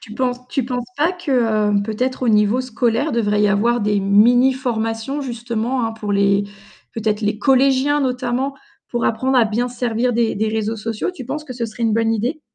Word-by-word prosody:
Tu 215 - -11
penses 250 0 -2
tu 270 - -1
penses 245 -1 -3
pas 325 +5 +2
que 355 -5 -7 0.4
heu, 200 -1 +2
peut-être 250 +5 -2
au - - +1
niveau 210 +3 +3
scolaire, 245 +1 0
il - - -5
devrait 210 -3 +1
y 210 - +4
avoir 230 +4 +2
des 205 -1 +1
mini 235 +7 +5
formations 235 +1 -3
justement, 240 -1 -2
hein, 225 - -4
pour 210 -2 -4
les 200 0 +2 0.5
peut-être 215 -1 -1
les 210 0 0
collégiens 270 +4 +3
notamment 255 +1 -1 0.3
pour 240 -1 -2
apprendre 260 +4 +1
à 240 - +5
bien 235 +4 -1
se 245 - -13
servir 245 0 0
des 230 -1 +1
des 215 +2 0
réseaux 220 0 -2
sociaux? 225 - -3
Tu 260 -8 -9
penses 300 +4 -5
que 260 - -7
ce 240 -1 -3
serait 220 +2 -8
une 220 - +2
bonne 225 0 +1
idée? 245 +8 -2
235 Hz, 210 wpm, -19 LUFS, 220-255 Hz, 0.5 s, mini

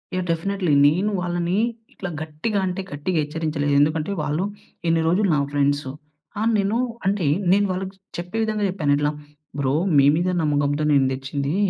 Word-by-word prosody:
Yeah! 185 -1 -1
Definitely. 180 +1 0 0.2
నేను 180 +8 +2
వాళ్ళని 175 +1 -1 0.4
ఇట్లా 195 - -6
గట్టిగా 160 +7 -2
అంటే 185 +1 -2
గట్టిగా 150 +5 -2
హెచ్చరించలేదు. 150 -1 -1
ఎందుకంటే 155 +4 +1
వాళ్ళు 150 +4 -1 0.4
ఇన్ని 165 0 +3
రోజులు 190 +5 +3
నా - - +2
ఫ్రెండ్స్ 145 0 +1 0.5
ఆహ్, 220 +2 +2
నేను 200 +3 +1 0.3
అంటే 195 -3 +1 0.3
నేను 205 +2 +4
వాళ్ళకి 190 +1 -4 0.2
చెప్పే 175 +5 -5
విధంగా 215 -1 -1
చెప్పాను. 160 -6 0
ఇట్లా 145 0 +1 0.5
బ్రో 135 -1 +1 0.2
మీ 140 - +6
మీద 175 +3 0
నమ్మకంతో 145 -1 +1
నేను 140 -2 +4
తెచ్చింది. 140 +3 -3
165 Hz, 155 wpm, -23 LUFS, 145-190 Hz, 0.5 s, మీ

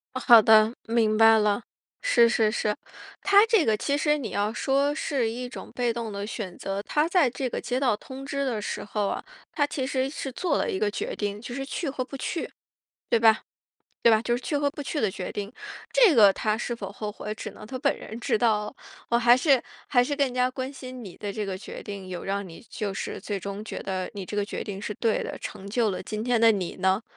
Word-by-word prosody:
啊， - - -1
好 235 -3 +10
的， 220 +1 +6
明 225 -2 +2
白 225 0 +7
了。 210 +1 +2 0.4
是 240 - +5
是 220 -2 +2
是。 210 -2 0 0.5
他 400 +2 +6
这 445 -7 +4
个 220 -1 +2
其 280 +6 0
实 300 0 +2
你 235 -7 -5
要 205 +1 0
说 275 +4 +1
是 265 -7 -1
一 245 +2 -5
种 245 - -9
被 245 -2 0
动 230 -2 -4
的 200 0 -4
选 200 -6 -6
择， 195 +1 -3
他 300 +7 +1
在 340 -7 +3
这 255 +2 -3
个 - - -4
接 250 +1 -1
到 245 -6 +2
通 265 +5 -9
知 280 0 -2
的 235 -5 -1
时 - - -4
候 205 0 -1
啊， - - -3 0.3
他 290 -3 +2
其 265 -2 -3
实 265 0 0
是 275 -2 -5
做 350 +5 0
了 - - 0
一 - - -1
个 205 +1 0
决 - - -4
定， 205 -1 -3
就 240 +2 -7
是 270 0 -3
去 295 +2 -3
和 265 -1 -3
不 270 +2 -8
去， 335 - -3 0.6
对 230 - +4
吧？ 225 -1 +5 0.6
对 235 - +7
吧？ 220 0 +4
就 240 0 +1
是 245 - -5
去 295 - -1
和 285 0 +1
不 290 - -7
去 295 - -3
的 215 -5 +2
决 185 -1 -5
定。 205 +1 -5 0.4
这 480 -9 +6
个 205 -5 +7
他 215 +1 0
是 240 +1 -3
否 195 -4 -6
后 210 +1 -5
悔， 210 +1 -5
只 - - -6
能 - - -12
他 255 +4 -6
本 - - +2
人 225 - -8
知 230 - 0
道 215 -3 +2
了。 210 - -8 0.4
我 235 - +4
还 240 +1 +6
是 270 -1 +3 0.3
还 245 -3 +4
是 285 +4 -1
更 275 -3 +1
加 250 0 +2
关 260 +1 -5
心 255 -3 -9
你 185 - -9
的 205 - -5
这 215 0 -3
个 190 -2 -4
决 - - -8
定， 200 -2 -7
有 180 -1 -6
让 195 -1 -2
你 165 - -12
就 205 -2 -3
是 - - -4
最 205 -2 -3
终 200 +2 -6
觉 - - -6
得 185 -1 -3
你 195 -2 -5
这 205 - -7
个 205 - +2
决 - - -4
定 200 -2 -6
是 210 0 -4
对 225 +1 0
的， - - -5
成 195 +1 -7
就 225 0 +1
了 185 - -4
今 215 0 -4
天 245 -2 +2
的 230 - +7
你 190 -4 -3
呢？ 190 +3 +1
230 Hz, 265 characters per minute, -26 LUFS, 205-265 Hz, 0.6 s, 好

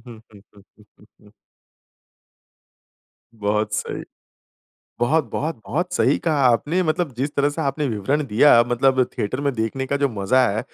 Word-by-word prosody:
हुँ, 115 -2 -11
हुँ, 100 -1 -20 0.2
हुँ, 105 - -19
हुँ, 105 - -20
हुँ। 105 -1 -21 2.0
बहुत 105 0 -1
सही। - - -4 1.0
बहुत, 135 0 +1
बहुत, 160 +1 -2
बहुत 175 +7 -2
सही - - +2
कहा 155 -4 0
आपने। 150 +9 +1
मतलब 155 -3 -1
जिस 140 +3 -1
तरह 140 +1 +2
से 145 - -5
आपने 145 +2 -1
विवरण 130 +7 -1
दिया, 115 +2 +5
मतलब 130 +1 +2
थिएटर 130 +7 -2
में 140 -1 0
देखने 115 +4 -3
का 140 - 0
जो 140 -1 +1
मज़ा 115 +4 +1
है 105 +2 -1
130 Hz, 155 wpm, -21 LUFS, 110-145 Hz, 2.0 s, दिया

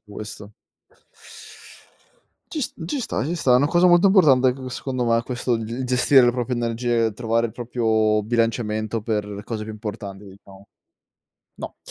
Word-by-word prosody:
questo. 105 0 -9 2.0
Ci 315 - -3
s - - -3
ci 225 - -3
sta, 235 - -2
ci 165 +5 -2
sta. 135 -6 +2
È - - +7
una 140 - +2
cosa 175 +1 +4
molto 175 +2 +6
importante 135 -10 +5
c 130 0 -8
secondo 130 -2 -3
me 115 0 +2
questo 125 0 -2
di 115 +3 -4
gestire 130 +2 +4
le 120 - +3
proprie 125 0 -2
energie, 115 -1 0
trovare 115 +1 0
il 110 - -10
proprio 110 -3 0
bilanciamento 115 -1 -1
per 105 -2 -3
cose 110 -1 -4
più 110 - -7
importanti, 105 -2 -7
diciamo. 100 0 -15 0.9
No. - - -8
115 Hz, 155 wpm, -22 LUFS, 110-130 Hz, 2.0 s, È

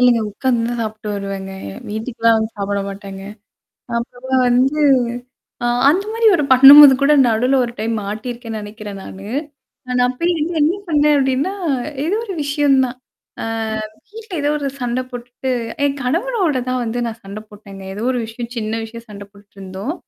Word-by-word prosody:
இல்லங்க 245 -2 +4
உட்காந்து 240 +2 0
தான் 240 0 -3
சாப்ப்டட்டு 215 -1 -5
வருவேங்க. 195 -1 -5 0.4
வீட்டுக்கெல்லாம் 225 +1 +1
வந்து 220 0 -2
சாப்பிட 200 0 -2
மாட்டேங்க. 195 -1 -8 0.8
அப்பதான் 255 +2 -1
வந்து 265 +5 +2 0.8
ஆ - - +1 0.2
அந்த 370 +6 +2
மாரி 455 0 0
ஒரு 300 - 0
பண்ணும்போது 275 +2 +10
கூட 290 +2 +5
நடுவுல 245 +4 +2
ஒரு 235 - -6
டைம் 225 +1 -1
மாட்டியிருக்கேன்னு 225 +2 -5
நெனைக்கிறேன் 205 -1 -8
நானு. 195 +1 -10 0.6
ந - - -11
நான் 250 0 +1
அப்பய 335 +8 -1
வந்து 325 +3 -1
என்ன 310 +4 +3
பன்னேன் 300 -2 +3
அப்டின்னா, 270 +7 0 0.5
ஏதோ 385 +5 0
ஒரு 390 - -5
விஷயம் 285 -1 +2
தான். 250 0 -7 0.4
அ - - -3 0.7
வீட்ல 440 -2 -10
ஏதோ 290 - +1
ஒரு 285 -2 -3
சண்ட 245 +1 -1
போட்டுட்டு, 245 +1 -5 0.3
என் 280 0 0
கணவரோட 340 - 0
தான் 255 -1 -1
வந்து 235 +1 -3
நான் 230 0 -5
சண்ட 200 +2 -7
போட்டேன்ங்க. 200 -2 -12
ஏதோ 205 - -6
ஒரு 250 - -1
விஷயம் 230 +2 -7
சின்ன 225 0 -2
விஷயம் 230 +1 -9
சண்ட 200 -1 -9
போட்டுட்டுருந்தோம். 200 +4 -7
245 Hz, 160 wpm, -18 LUFS, 215-280 Hz, 0.8 s, பண்ணும்போது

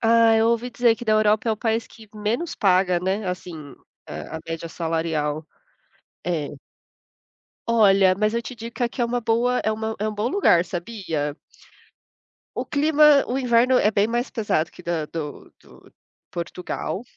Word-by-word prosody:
Ah, 230 0 +5
eu 225 +1 +3
ouvi 235 +1 0
dizer 235 -1 +3
que 240 - -8
da 215 - +2
Europa 215 +1 +3
é - - +3
o 215 - -3
país 225 +1 -1
que 220 -2 -16
menos 220 +10 -2
paga, 185 -4 +3
né? 190 +3 -1
Assim 170 -6 -6 0.3
a 160 - -7
a - - -7
média 165 0 -4
salarial. 160 -2 -2 0.8
É. 165 -5 -1 1.2
Olha, 195 -5 +5
mas 215 +1 +1
eu 235 - 0
te 255 - -7
digo 230 +1 -8
que 250 - -4
aqui 240 +2 -2
é - - +3
uma 245 +1 -1
boa 235 +2 +1
é 220 - +2
uma 220 0 -3
é 215 +1 -1
um 215 - -4
bom 210 +3 -1
lugar, 215 - +3
sabia? 170 -6 -4 1.2
O - - -2
clima 300 -1 +5
o 255 - -1
inverno 250 0 +3
é 210 - +3
bem 205 0 +2
mais 240 +2 -2
pesado 175 -8 -1
que 180 - -14
da 170 -3 -2
do 150 -3 -7
do - - -19 0.4
Portugal, 180 +3 -4
215 Hz, 175 wpm, -23 LUFS, 175-235 Hz, 1.2 s, Ah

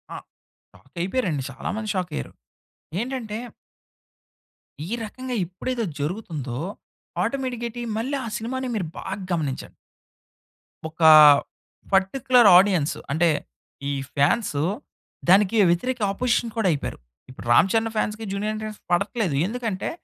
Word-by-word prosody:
ఆ! - - -5 0.5
షాకయిపోయారండి. 175 - -3
చాలా 130 - -6
మంది 215 -1 -4
షాకయ్యారు. 180 -5 -3 0.7
ఏంటంటే 235 -3 -4 1.5
ఈ - - -8
రకంగా 255 +3 -5
ఎప్పుడైతే 230 +7 -4 0.2
జరుగుతుందో 150 - -4 0.6
ఆటోమేటిక్‌గేటి 245 -3 -3 0.2
మళ్ళి 265 +5 -2
ఆ - - -4
సినిమాని 255 +3 -4
మీరు 190 -7 -2
బాగా 195 0 -5
గమనించండి. 150 -6 -3 1.2
ఒక 165 +1 -14 0.9
పర్టిక్యులర్ 235 +4 +4
ఆడియన్సు. 180 -6 +2
అంటే 165 +3 +3 0.6
ఈ - - -1 0.2
ఫాన్సు 145 +1 +2 0.7
దానికి 205 +3 +5
వ్యతిరేక 245 +9 0
అపోజిషన్ 235 0 0
కూడా 220 - +2
అయిపోయారు. 145 - -3 0.3
ఇప్పుడు 130 - -11
రామ్ 170 +10 +6
చరణ్ 225 0 +1
ఫాన్స్‌కి 215 +1 -2
జూనియర్ 205 +2 -2
యన్‌టి‌అర్స్‌కి 215 -1 -7
పడట్లేదు. 200 - 0
ఎందుకంటే 225 -3 -3
210 Hz, 110 wpm, -24 LUFS, 175-235 Hz, 1.5 s, రామ్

